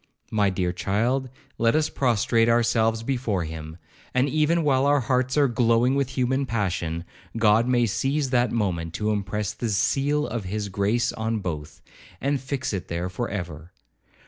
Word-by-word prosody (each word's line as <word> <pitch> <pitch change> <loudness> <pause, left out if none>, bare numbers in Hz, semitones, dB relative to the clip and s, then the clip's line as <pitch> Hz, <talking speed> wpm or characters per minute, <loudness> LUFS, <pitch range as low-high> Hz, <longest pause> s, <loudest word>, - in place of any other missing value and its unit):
My 105 -2 +2
dear 90 -2 -1
child, 120 +8 0 0.3
let 115 +2 +3
us 155 0 +2
prostrate 115 -2 +2
ourselves 115 -1 +2
before 115 -8 -1
him, 80 0 -7 0.4
and 130 +2 +3
even 155 +3 +2
while 135 -2 +3
our 145 -1 +4
hearts 130 +2 0
are 145 -1 +5
glowing 120 +1 +2
with 140 -1 -1
human 130 +2 +1
passion, 85 -7 -2 0.3
God 110 +1 +4
may 120 -1 +3
seize 135 +5 0
that 120 -2 +2
moment 85 -7 -1
to 105 +2 0
impress 105 0 -2
the 115 +2 -3
seal 140 +8 +1
of 115 -7 -4
his 105 +2 -3
grace 100 +5 0
on 110 0 -2
both, 80 -7 -6 0.4
and 140 0 0
fix 130 -3 -3
it 95 - -4
there 85 +2 -3
for 115 +6 -3
ever. 85 -3 -6
115 Hz, 165 wpm, -25 LUFS, 100-130 Hz, 0.4 s, are